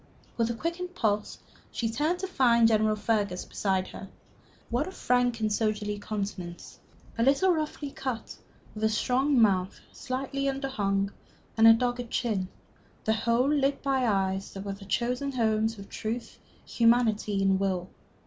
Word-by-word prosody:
With 230 Hz, -1 st, +1 dB
a 235 Hz, -, -2 dB
quickened 355 Hz, +6 st, -4 dB
pulse 210 Hz, -7 st, 0 dB, 0.3 s
she 230 Hz, -, -2 dB
turned 295 Hz, +10 st, 0 dB
to 380 Hz, -, -2 dB
find 235 Hz, -9 st, +4 dB
General 215 Hz, -1 st, +3 dB
Fergus 205 Hz, -3 st, -1 dB
beside 190 Hz, -2 st, -1 dB
her. 195 Hz, -, -9 dB, 0.6 s
What 250 Hz, +6 st, 0 dB
a -, -, -6 dB
frank 245 Hz, -7 st, +1 dB
and 215 Hz, -1 st, +1 dB
soldierly 210 Hz, -1 st, -1 dB
countenance! 195 Hz, -5 st, -6 dB, 0.4 s
a -, -, +4 dB
little 285 Hz, +8 st, +4 dB
roughly 305 Hz, -2 st, -3 dB
cut, 260 Hz, -5 st, -5 dB, 0.4 s
with 215 Hz, -, -6 dB
a 220 Hz, -, +4 dB
strong 255 Hz, +5 st, +2 dB
mouth 190 Hz, -4 st, +2 dB
slightly 275 Hz, +1 st, -3 dB
underhung, 205 Hz, -8 st, -1 dB, 0.4 s
and 225 Hz, 0 st, +6 dB
a 225 Hz, -, +10 dB
dogged 245 Hz, +1 st, -1 dB
chin, 210 Hz, -7 st, -1 dB, 0.6 s
the 220 Hz, -, +3 dB
whole 235 Hz, +3 st, +2 dB
lit 280 Hz, -1 st, +1 dB
by 265 Hz, -3 st, +1 dB
eyes 195 Hz, -2 st, 0 dB
that 195 Hz, -, -6 dB
were 200 Hz, -, -3 dB
the 195 Hz, 0 st, -11 dB
chosen 250 Hz, +6 st, -1 dB
homes 220 Hz, -2 st, +1 dB
of 200 Hz, 0 st, -10 dB
truth, 230 Hz, +2 st, -5 dB, 0.3 s
humanity, 230 Hz, -3 st, +2 dB
and 195 Hz, -1 st, +3 dB
will. 185 Hz, -2 st, -1 dB
225 Hz, 155 wpm, -28 LUFS, 205-260 Hz, 0.6 s, a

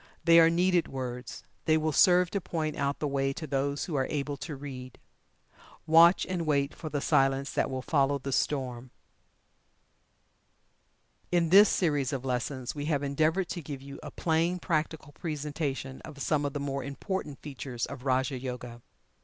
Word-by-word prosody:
They 165 Hz, 0 st, +7 dB
are 165 Hz, 0 st, +7 dB
needed 175 Hz, +1 st, +2 dB
words 125 Hz, -2 st, -6 dB, 0.2 s
they 155 Hz, -1 st, +4 dB
will 155 Hz, 0 st, 0 dB
serve 180 Hz, +2 st, +5 dB
to 200 Hz, -, -1 dB
point 155 Hz, -3 st, -3 dB
out 140 Hz, 0 st, -1 dB
the 150 Hz, -, -2 dB
way 135 Hz, -1 st, 0 dB
to 155 Hz, -, -6 dB
those 140 Hz, 0 st, -1 dB
who 170 Hz, -, -6 dB
are 135 Hz, -2 st, +1 dB
able 145 Hz, -1 st, -2 dB
to 150 Hz, +1 st, -6 dB
read. 130 Hz, -3 st, -8 dB, 0.9 s
"Watch 165 Hz, +3 st, +6 dB
and 175 Hz, -3 st, -3 dB
wait 140 Hz, -1 st, +1 dB
for 160 Hz, -, -7 dB
the 150 Hz, -, -2 dB
Silence 135 Hz, 0 st, +2 dB
that -, -, 0 dB
will 130 Hz, -1 st, -4 dB
follow 140 Hz, -2 st, +2 dB
the 135 Hz, 0 st, -5 dB
Storm." 130 Hz, -3 st, -1 dB, 2.4 s
In 170 Hz, -2 st, +2 dB
this 200 Hz, +4 st, +8 dB
series 145 Hz, -6 st, +1 dB
of 135 Hz, -2 st, -4 dB
lessons 130 Hz, 0 st, -2 dB
we 145 Hz, -1 st, -5 dB
have 145 Hz, -2 st, 0 dB
endeavored 155 Hz, +6 st, +1 dB
to 175 Hz, -, -4 dB
give 140 Hz, -3 st, -7 dB
you 140 Hz, 0 st, -9 dB
a -, -, -7 dB
plain, 165 Hz, +2 st, 0 dB
practical 155 Hz, -3 st, -2 dB
presentation 145 Hz, -3 st, -4 dB
of 150 Hz, -3 st, -11 dB
some 145 Hz, +1 st, 0 dB
of 140 Hz, -, -2 dB
the 145 Hz, -, -3 dB
more 140 Hz, -1 st, -3 dB
important 145 Hz, +2 st, -4 dB
features 130 Hz, -4 st, -4 dB
of 125 Hz, -, -9 dB
"Raja 130 Hz, 0 st, 0 dB
Yoga." 125 Hz, -2 st, -6 dB
145 Hz, 170 wpm, -29 LUFS, 135-160 Hz, 2.4 s, this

